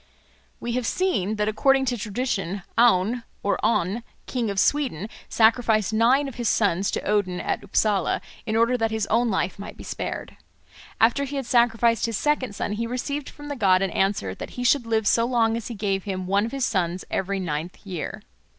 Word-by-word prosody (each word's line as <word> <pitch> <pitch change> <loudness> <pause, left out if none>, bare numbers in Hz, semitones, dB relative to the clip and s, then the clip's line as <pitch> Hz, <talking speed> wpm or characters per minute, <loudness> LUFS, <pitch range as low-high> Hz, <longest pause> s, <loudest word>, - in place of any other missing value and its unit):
We 240 - -4
have 245 -1 -1
seen 220 - 0
that 210 0 0
according 270 +5 +3
to 245 -1 0
tradition, 205 -4 -3
Aun 230 0 +3 0.2
or 200 - 0
On, 205 +1 +1 0.2
King 240 -4 -2
of 200 -1 -1
Sweden, 245 - +1 0.2
sacrificed 220 -2 +3
nine 250 +6 +4
of 270 - -8
his 235 - +1
sons 195 -2 +2
to - - -2
Odin 195 -3 0
at - - -2
Upsala 205 0 +1 0.3
in 220 - 0
order 230 +2 +3
that 225 0 +1
his 220 -2 -1
own 235 +2 +3
life 190 -1 -1
might 200 - -8
be - - -9
spared. - - -5 0.6
After 240 +5 +4
he 280 +1 -5
had 270 -2 -2
sacrificed 235 -1 +3
his 230 -3 -2
second 265 -8 0
son - - -3
he 230 +2 -2
received 270 +4 -3
from 290 0 -11
the 290 - -4
god 195 -5 +3
an 190 - -1
answer 190 - 0
that - - -7
he 245 - -2
should 250 -1 +3
live 220 -1 +1
so 230 +3 +4
long 230 -2 +2
as 230 -2 -4
he 235 - -6
gave 195 -2 -1
him 185 -2 -3
one 200 +4 +1
of - - -7
his 275 -2 0
sons 180 -3 -1
every 195 +1 -1
ninth 165 -1 -3
year. 180 -5 -5
220 Hz, 200 wpm, -24 LUFS, 195-245 Hz, 0.6 s, nine